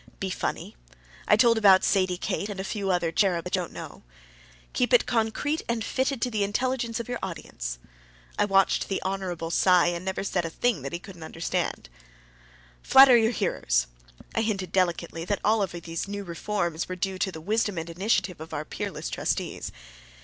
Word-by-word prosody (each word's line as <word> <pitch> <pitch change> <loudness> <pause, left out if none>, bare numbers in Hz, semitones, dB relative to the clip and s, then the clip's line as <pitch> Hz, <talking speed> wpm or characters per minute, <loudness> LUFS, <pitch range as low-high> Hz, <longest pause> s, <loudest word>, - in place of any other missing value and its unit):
"Be 190 -1 -2
funny." - - -3 0.5
I - - +6
told 230 +1 +4
about 195 -3 +6
Sadie 185 -2 +2
Kate 200 +3 -2
and 200 -2 -6
a - - -2
few 195 0 -3
other 175 -3 +1
cherubs 175 -2 +2
that 180 - -1
you 185 - 0
don't 175 - -7
know. - - -9 0.7
"Keep 250 +1 +1
it 245 - +6
concrete 245 +6 0
and 230 -1 -1
fitted 260 -2 -1
to 250 - 0
the 210 -2 0
intelligence 235 +2 -1
of 235 - -5
your 245 -1 -3
audience." - - -5 0.6
I - - +2
watched 195 -1 +2
the 195 - 0
Hon. 185 -4 -3
Cy, 180 0 +5
and 175 0 -4
never 190 +1 -2
said 185 -3 -1
a 165 - -3
thing 215 - 0
that 135 - -5
he - - -1
couldn't 180 -1 -12
understand. 160 - -3 0.9
"Flatter 265 -1 +8
your 225 -1 +4
hearers." - - 0 0.5
I 225 - +1
hinted 195 -5 -2
delicately 170 -3 0
that 205 +2 0
all 215 +1 +3
of 190 -3 -1
these 170 +1 -5
new 200 0 -4
reforms 175 -2 -2
were 185 - -3
due 190 +1 -3
to 190 +2 0
the 160 - -8
wisdom 205 +2 0
and 165 0 -3
initiative 180 -1 0
of 160 - -7
our 150 - -3
peerless - - -5
trustees. - - -2
190 Hz, 190 wpm, -26 LUFS, 170-220 Hz, 0.9 s, Flatter